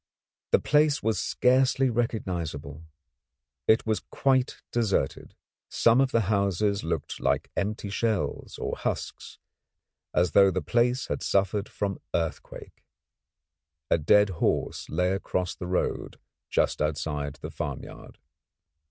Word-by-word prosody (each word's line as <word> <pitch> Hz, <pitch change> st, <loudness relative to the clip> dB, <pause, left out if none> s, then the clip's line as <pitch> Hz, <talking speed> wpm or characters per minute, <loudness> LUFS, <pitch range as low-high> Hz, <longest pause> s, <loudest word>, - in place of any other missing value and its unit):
The -, -, +5 dB
place 150 Hz, 0 st, +2 dB
was 110 Hz, -1 st, +1 dB
scarcely 130 Hz, +1 st, +3 dB
recognisable. 85 Hz, -10 st, -3 dB, 0.8 s
It 110 Hz, -, +4 dB
was 110 Hz, -1 st, +1 dB
quite 130 Hz, -2 st, 0 dB
deserted; 105 Hz, -, -1 dB, 0.3 s
some 115 Hz, +3 st, +4 dB
of 135 Hz, -, +2 dB
the 115 Hz, -, +3 dB
houses 100 Hz, 0 st, +1 dB
looked 80 Hz, -3 st, -3 dB
like -, -, 0 dB
empty 105 Hz, 0 st, -2 dB
shells 110 Hz, -1 st, -2 dB
or -, -, -3 dB
husks, -, -, -4 dB, 0.7 s
as 90 Hz, -2 st, +2 dB
though 100 Hz, +4 st, +6 dB
the 95 Hz, 0 st, -1 dB
place 125 Hz, +2 st, +1 dB
had -, -, -3 dB
suffered 100 Hz, +1 st, 0 dB
from 100 Hz, -2 st, -3 dB, 0.2 s
earthquake. 80 Hz, -1 st, -5 dB, 1.1 s
A -, -, +4 dB
dead 105 Hz, +7 st, +5 dB
horse -, -, 0 dB
lay 90 Hz, +1 st, +1 dB
across 90 Hz, -2 st, -2 dB
the 90 Hz, -, -7 dB
road 90 Hz, 0 st, -2 dB, 0.3 s
just -, -, +1 dB
outside 75 Hz, -1 st, -2 dB
the -, -, -8 dB
farmyard. 70 Hz, -2 st, -7 dB
100 Hz, 120 wpm, -27 LUFS, 85-115 Hz, 1.1 s, though